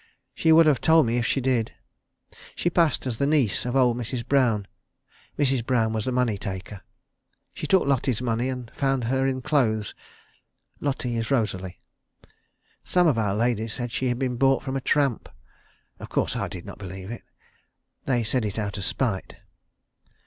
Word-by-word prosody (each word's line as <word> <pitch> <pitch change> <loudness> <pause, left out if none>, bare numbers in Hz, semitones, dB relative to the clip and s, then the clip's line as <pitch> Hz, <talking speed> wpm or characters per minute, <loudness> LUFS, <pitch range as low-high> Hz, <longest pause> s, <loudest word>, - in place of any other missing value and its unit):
She 160 - +2
would 165 +1 +7
have 145 -5 +3
told 160 -2 +5
me 115 +1 0
if 120 - 0
she - - +1
did. 125 -3 0 0.8
She 175 - 0
passed 165 -6 +2
as 120 -4 -3
the 140 - +2
niece 145 -10 +1
of 125 - -2
old 125 -3 +4
Mrs. 120 0 -4
Brown. 120 -7 +2 0.7
Mrs. 135 -4 +1
Brown 115 -3 +1
was 110 -1 -2
the 130 - -1
money 125 -5 0
taker. 95 +1 -6 0.7
She - - -5
took 190 -2 +4
Lotty's 130 -4 +1
money 120 0 -1
and 125 -3 -6
found 135 -4 0
her 130 +3 +1
in 130 -1 -2
clothes. 110 -9 +1 0.9
Lotty 130 -4 -2
is 115 0 -2
Rosalie. 95 -8 -1 1.0
Some 180 -1 +2
of 145 -8 +3
our 100 -3 0
ladies 115 -1 0
said 120 -1 -4
she 130 - -1
had 120 -1 0
been 125 -2 -2
bought 135 +1 +3
from 135 -1 -4
a 135 - -1
tramp. 140 -4 +1 0.7
Of - - -9
course - - 0
I - - -1
did 90 -2 -8
not - - -10
believe 95 +1 -7
it. 120 - -7 0.8
They 125 -3 +1
said 115 +3 0
it 105 -1 -3
out 105 -2 -3
of - - -4
spite. 110 -8 -2
125 Hz, 180 wpm, -25 LUFS, 110-135 Hz, 1.0 s, would